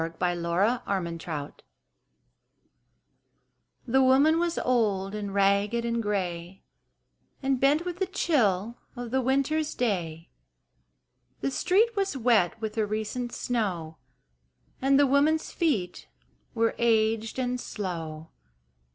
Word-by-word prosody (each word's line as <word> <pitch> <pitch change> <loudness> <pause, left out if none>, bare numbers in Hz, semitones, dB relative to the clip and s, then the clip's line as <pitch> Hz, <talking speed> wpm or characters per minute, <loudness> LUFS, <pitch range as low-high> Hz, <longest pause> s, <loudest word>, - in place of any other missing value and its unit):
Y 165 - -1 0.2
Z 175 - -5
Somebody's 175 -2 -1
Mother 150 -3 -4 2.3
THE 265 +1 +3
woman 275 +5 +4
was 340 -1 -1
old 205 -6 0
and 205 -1 -4
ragged 200 +4 +2
and 235 0 -1
gray 185 -3 -3 0.8
And 270 -1 +1
bent 290 +6 +3
with 355 0 -5
the 380 - 0
chill 235 - 0 0.2
of 240 -1 -6
the 265 +1 +1
Winter's 275 +4 0
day. 170 -9 -2 1.1
The 135 - -1
street 435 - +2
was 390 -7 -1
wet 225 -6 +2
with 220 0 -4
a 215 - +2
recent 220 +3 -3
snow 180 -12 -2 0.8
And 270 +1 +4
the 285 - +6
woman's 290 +4 +2
feet 245 - -1 0.5
were 230 0 +2
aged 225 -1 +1
and 250 -1 -1
slow. 165 -5 -6
225 Hz, 115 wpm, -27 LUFS, 190-265 Hz, 2.3 s, the